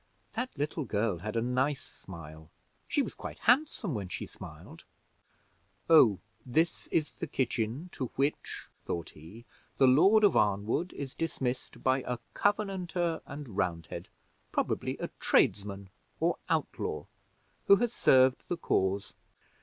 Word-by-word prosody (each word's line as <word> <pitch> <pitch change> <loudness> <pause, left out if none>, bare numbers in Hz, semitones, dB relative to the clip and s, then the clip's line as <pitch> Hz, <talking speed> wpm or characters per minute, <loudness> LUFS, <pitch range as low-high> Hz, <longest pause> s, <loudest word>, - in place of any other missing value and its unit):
That 250 +2 -2
little 150 +2 -1
girl 105 -6 0
had 105 +5 -5
a 115 - +1
nice 130 +3 0
smile 80 -3 -11 0.4
she - - +2
was - - -5
quite - - -7
handsome 245 - +2
when 100 -5 -4
she - - -4
smiled. - - -11 1.1
Oh, 115 - +8 0.3
this 160 +7 0
is 155 -2 0
the 170 - -5
kitchen, 130 +3 -1
to 130 - -3
which," 140 +2 -1 0.2
thought 85 -2 -4
he, 90 +10 -13 0.3
"the 135 - +6
Lord 190 +12 +6
of 205 - +5
Arnwood 105 - +1
is 140 -2 -6
dismissed 130 -6 -3
by 130 0 +3
a 125 - -1 0.2
Covenanter 185 -5 0
and 140 -7 -8
Roundhead, 85 -5 -2 0.4
probably - - -1
a - - -4
tradesman 100 -1 +2 0.3
or - - +1
outlaw, - - -1 0.6
who 200 - +9
has 240 +2 0
served 130 0 +4
the 175 - -2
cause. 100 - 0
130 Hz, 135 wpm, -30 LUFS, 100-165 Hz, 1.1 s, who